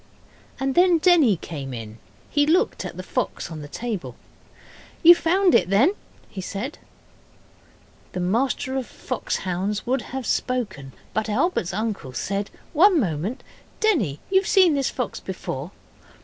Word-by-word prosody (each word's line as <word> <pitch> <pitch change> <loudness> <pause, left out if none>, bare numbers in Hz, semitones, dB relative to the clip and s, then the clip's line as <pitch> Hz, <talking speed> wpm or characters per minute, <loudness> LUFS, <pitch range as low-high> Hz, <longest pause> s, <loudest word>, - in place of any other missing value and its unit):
And 270 0 0
then 355 +1 +5
Denny 315 - +5
came 140 -6 -6
in. 110 -1 -8 0.3
He 290 0 +2
looked 365 +8 +2
at - - -7
the - - -5
fox - - -3
on 155 -2 -6
the 145 - -8
table. 220 +3 -5 0.9
'You 340 +1 +11
found 360 +2 +2
it, 180 - +4
then?' 240 - +4 0.3
he 190 - -7
said. 205 +10 -5 1.3
The 180 - -3
M.F.H. 230 +10 0 1.2
would 255 +1 0
have 265 0 -6
spoken 215 - -2 0.2
but 220 +1 -1
Albert's 215 - 0
uncle 205 - -3
said, 200 +8 -2 0.2
'One 350 +2 +6
moment, 185 - -2 0.4
Denny; 260 - +1
you've 380 -1 +3
seen 375 -6 +5
this 275 -2 +1
fox 250 -5 -4
before? 165 -5 -5
235 Hz, 135 wpm, -24 LUFS, -, 1.3 s, You